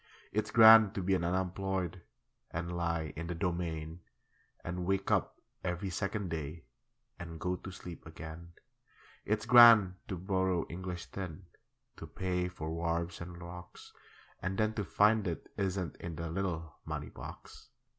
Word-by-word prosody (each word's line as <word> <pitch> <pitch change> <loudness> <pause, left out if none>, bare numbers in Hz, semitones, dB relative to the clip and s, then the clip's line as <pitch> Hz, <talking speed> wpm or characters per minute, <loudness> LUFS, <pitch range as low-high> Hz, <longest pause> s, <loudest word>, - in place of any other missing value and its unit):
It's 110 - -1
grand 110 -3 +8
to 95 - -2
be 95 +2 +2
an 90 - +1
unemployed 95 0 -1 0.5
And 85 +1 -4
lie 85 -3 -1
in 85 +2 -5
the 90 - -3
Domain, 85 -2 -3 0.6
And 90 +1 -4
wake 95 0 0
up - - +1 0.2
every 90 +2 -2
second 100 +1 -2
day 80 0 -4 0.6
And 80 -2 -7
go 90 +2 -1
to 95 - -9
sleep 90 -3 -9
again. 80 +1 -9 0.7
It's 105 +1 0
grand 115 -6 +8
to 95 - -4
borrow 95 -1 0
English 90 0 -6
tin 95 -1 -6 0.5
To - - -8
pay 90 -1 -1
for 80 -3 -5
wharves 85 +1 -2
and 85 0 -8
Rocks, 90 0 -10 0.5
And 95 +1 -2
then 110 0 +2
to 105 - -2
find 105 +1 +3
it 85 - -5
isn't 95 -4 -2
in 85 -1 -6
The 85 +1 -4
little 85 -3 -3
money - - -5
box. - - -11
90 Hz, 150 wpm, -32 LUFS, 85-95 Hz, 0.7 s, grand